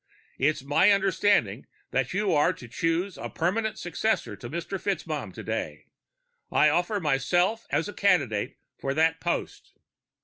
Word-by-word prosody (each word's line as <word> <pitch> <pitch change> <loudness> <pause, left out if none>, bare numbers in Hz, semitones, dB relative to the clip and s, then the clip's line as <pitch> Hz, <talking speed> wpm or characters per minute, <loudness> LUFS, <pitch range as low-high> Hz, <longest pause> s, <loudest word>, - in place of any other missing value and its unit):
It's 145 +1 +1
my 145 +8 +4
understanding 195 - +2 0.2
that 135 -1 0
you 200 +1 +1
are 150 +4 +3
to 125 - -12
choose 165 - -1
a - - -5
permanent 215 +6 -1
successor - - -1
to - - -9
Mr. - - -4
FitzMaugham - - -3
today. - - -5 0.7
I 150 - +5
offer 175 +7 +1
myself 175 - +1
as 160 - 0
a 205 - -6
candidate 140 - +1 0.2
for 135 0 -2
that 160 +1 +2
post." 175 - -3
165 Hz, 140 wpm, -27 LUFS, 140-195 Hz, 0.7 s, I